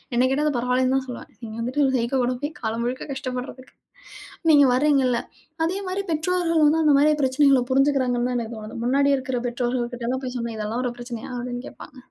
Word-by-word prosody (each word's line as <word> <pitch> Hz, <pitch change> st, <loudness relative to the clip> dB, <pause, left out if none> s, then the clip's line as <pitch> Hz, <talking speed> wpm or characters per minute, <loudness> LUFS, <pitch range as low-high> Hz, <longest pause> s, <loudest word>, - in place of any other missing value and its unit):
என்னகேட்ட, 265 Hz, +4 st, +2 dB
அது 300 Hz, -3 st, +1 dB
பரவால்லன்னுதான் 255 Hz, +2 st, +1 dB
சொல்லுவேன். 250 Hz, -, -8 dB
இங்க 220 Hz, -1 st, -8 dB
இருந்துட்டு, 255 Hz, +5 st, 0 dB
ஒரு 265 Hz, -, 0 dB
சைக்கோ 240 Hz, +3 st, 0 dB
கூட 250 Hz, +1 st, +1 dB
போய் 295 Hz, +2 st, -2 dB
காலம் 225 Hz, 0 st, -2 dB
முழுக்க 255 Hz, +2 st, -3 dB
கஷ்டப்படுறதுக்கு. 255 Hz, -1 st, -6 dB, 0.8 s
நீங்க 290 Hz, -2 st, +7 dB
வர்றீங்க 275 Hz, +1 st, +3 dB
இல்ல. 240 Hz, -1 st, +1 dB, 0.5 s
அதே 360 Hz, +4 st, -1 dB
மாரி 385 Hz, +2 st, -2 dB
பெற்றோர்களும், 330 Hz, 0 st, +2 dB, 0.2 s
அந்த 305 Hz, -2 st, +4 dB
மாரி, 300 Hz, +2 st, +5 dB
பிரச்சனைகளை 270 Hz, 0 st, +4 dB
புரிஞ்சுக்கிறாங்கன்னுதான் 255 Hz, -3 st, +2 dB
எனக்குத் 230 Hz, 0 st, -6 dB
தோணுது. 215 Hz, +2 st, -7 dB
முன்னாடி 280 Hz, +3 st, +3 dB
இருக்கிற, 260 Hz, -1 st, -3 dB
பெற்றோர்கள்கிட்டல்லாம் 245 Hz, +1 st, -2 dB
போய் 250 Hz, 0 st, -5 dB
சொன்னா, 235 Hz, -1 st, -4 dB
இதெல்லாம் 220 Hz, +4 st, -2 dB
ஒரு 245 Hz, -, -1 dB
பிரச்சனையா? 240 Hz, 0 st, -7 dB
அப்படின்னு, 245 Hz, 0 st, -5 dB
கேட்பாங்க. -, -, -12 dB
255 Hz, 175 wpm, -23 LUFS, 240-280 Hz, 0.8 s, நீங்க